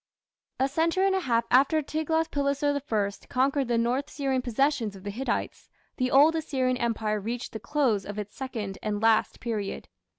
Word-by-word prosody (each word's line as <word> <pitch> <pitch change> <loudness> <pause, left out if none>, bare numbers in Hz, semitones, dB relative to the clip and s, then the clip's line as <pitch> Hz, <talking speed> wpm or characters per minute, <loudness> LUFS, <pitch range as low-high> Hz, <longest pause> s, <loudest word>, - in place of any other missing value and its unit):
A 265 - +3
century 330 +6 +1
and 390 -1 +3
a - - +2
half 235 -8 +1
after 280 +5 +4
Tiglath 315 +2 -1
pileser 285 0 0 0.2
I 200 -2 -1
conquered 270 +1 +1
the 235 -1 +1
north 250 +5 0
Syrian 270 -3 -1
possessions 250 -3 0
of 190 - -12
the 205 - -4
Hittites, 255 +6 -3 0.3
the 255 -1 +1
Old 295 +5 +6
Assyrian 260 -5 0
Empire 220 -3 -1
reached 230 +4 -4
the 220 - -6
close 235 -4 +1
of 205 0 -7
its 210 -1 -6
second 220 -7 -5
and 210 -1 -2
last 225 0 +2
period. 215 -4 -4
255 Hz, 175 wpm, -27 LUFS, 220-285 Hz, 0.3 s, Old